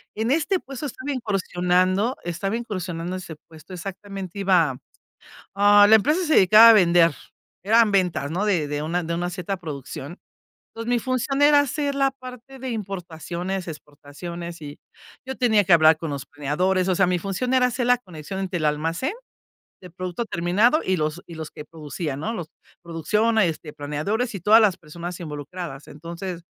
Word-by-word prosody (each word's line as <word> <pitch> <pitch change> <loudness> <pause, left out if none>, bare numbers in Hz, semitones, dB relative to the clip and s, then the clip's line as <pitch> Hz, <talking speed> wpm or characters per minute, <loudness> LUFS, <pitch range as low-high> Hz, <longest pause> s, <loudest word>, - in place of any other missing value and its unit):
en 225 +3 -1
este 330 +5 +1
puesto 275 +2 -7
estaba 260 +3 -6
incursionando, 185 -1 0
estaba 175 +5 -3
incursionando 185 -6 -4
ese 170 -4 -8
puesto, 160 +3 -13
exactamente 195 +1 -7
iba 175 -9 +2 0.8
ah, 205 +1 +6
la 220 - +9
empresa 300 - +1
se 310 - +2
dedicaba 215 +5 +8
a - - +10
vender, 170 -4 +5 0.5
eran 225 +1 +4
ventas, 180 -7 +1
¿no? 180 +6 -1
De 175 -7 +1
de 145 0 -3
una 170 +3 -1
de 170 +1 -3
una 175 +1 -2
cierta 180 +1 -4
producción. 145 0 -7 0.6
Entonces, 230 +1 -6
mi 245 - +3
función 260 +3 -1
era 290 0 +7
hacer 285 +1 -1
la 275 -1 +2
parte 255 0 -11
de 260 -1 -4
importaciones, 185 -2 -5
exportaciones, 160 +3 -9
y 145 0 -9 0.5
yo 265 0 -5
tenía 220 -5 +3
que 175 - +2
hablar 155 -1 +5
con 160 -2 -5
los 140 -2 -5
planeadores, 180 +6 0
o 185 - +2
sea, 195 - +4
mi 180 - +1
función 195 +8 -3
era 255 -1 +4
hacer 245 0 -2
la 245 -1 +4
conexión 180 -3 -8
entre 185 -2 -3
el 155 - 0
almacén 165 - -1 0.7
de 180 - -11
producto 180 +5 -5
terminado, 205 - +2
y 185 0 +1
los 155 +3 -2
y 170 - -10
los 160 -1 -7
que 150 - -9
producían, 150 -2 -6
¿no?, 225 +7 -3
los 170 -5 -6 0.3
producción, 210 +7 0
este, 165 -6 0
planeadores 155 - -3
y 195 - -5
todas 215 +5 +6
las 200 -4 +3
personas 170 +2 -8
involucradas. 150 -1 -7
Entonces 170 +3 -7
185 Hz, 175 wpm, -23 LUFS, 165-220 Hz, 0.8 s, a